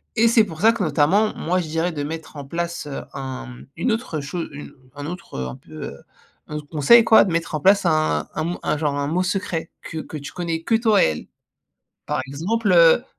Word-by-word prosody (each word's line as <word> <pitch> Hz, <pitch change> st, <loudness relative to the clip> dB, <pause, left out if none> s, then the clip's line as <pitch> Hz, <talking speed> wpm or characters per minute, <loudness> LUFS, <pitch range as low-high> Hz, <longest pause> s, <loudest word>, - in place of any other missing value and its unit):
et 230 Hz, 0 st, +4 dB
c'est 225 Hz, -1 st, +5 dB
pour 165 Hz, -5 st, -9 dB
ça 225 Hz, +2 st, +7 dB
que 235 Hz, -, -4 dB
notamment, 170 Hz, +7 st, +2 dB
moi 180 Hz, +3 st, 0 dB
je 165 Hz, -, -6 dB
dirais 165 Hz, +3 st, -1 dB
de 145 Hz, -, -4 dB
mettre 160 Hz, +2 st, -6 dB
en 140 Hz, -, -7 dB
place, 170 Hz, +2 st, -4 dB
heu, 140 Hz, -, -5 dB
un 130 Hz, -2 st, -6 dB, 0.2 s
une 250 Hz, -, +1 dB
autre 220 Hz, -, -2 dB
chose, 165 Hz, +5 st, -4 dB
heu, 145 Hz, -, -10 dB, 0.2 s
un 145 Hz, 0 st, -6 dB
autre, 175 Hz, +1 st, -8 dB
heu, 65 Hz, -, -2 dB
un 65 Hz, -, -7 dB
peu, -, -, -18 dB
heu, 70 Hz, -, -9 dB, 0.5 s
un 150 Hz, -, -7 dB
autre 150 Hz, -1 st, -8 dB
conseil 170 Hz, +10 st, +6 dB
quoi, 225 Hz, -1 st, +7 dB
de 190 Hz, -, -2 dB
mettre 165 Hz, 0 st, -2 dB
en -, -, -1 dB
place 195 Hz, +4 st, +4 dB
un 155 Hz, -2 st, +1 dB
un 170 Hz, +3 st, -2 dB
un -, -, 0 dB
genre 145 Hz, -2 st, -1 dB
un 140 Hz, -, -1 dB
mot 170 Hz, +5 st, 0 dB
secret 180 Hz, -3 st, -2 dB
que 160 Hz, -, -6 dB
que 155 Hz, -, -7 dB
tu 145 Hz, -1 st, -8 dB
connais 165 Hz, -2 st, -3 dB
que 230 Hz, -, -1 dB
toi 220 Hz, -2 st, +4 dB
et -, -, +5 dB
elle. 80 Hz, -1 st, -4 dB, 0.8 s
Par -, -, -1 dB
exemple, 195 Hz, +9 st, 0 dB
heu, 170 Hz, +7 st, +6 dB
165 Hz, 230 wpm, -22 LUFS, 145-195 Hz, 0.8 s, ça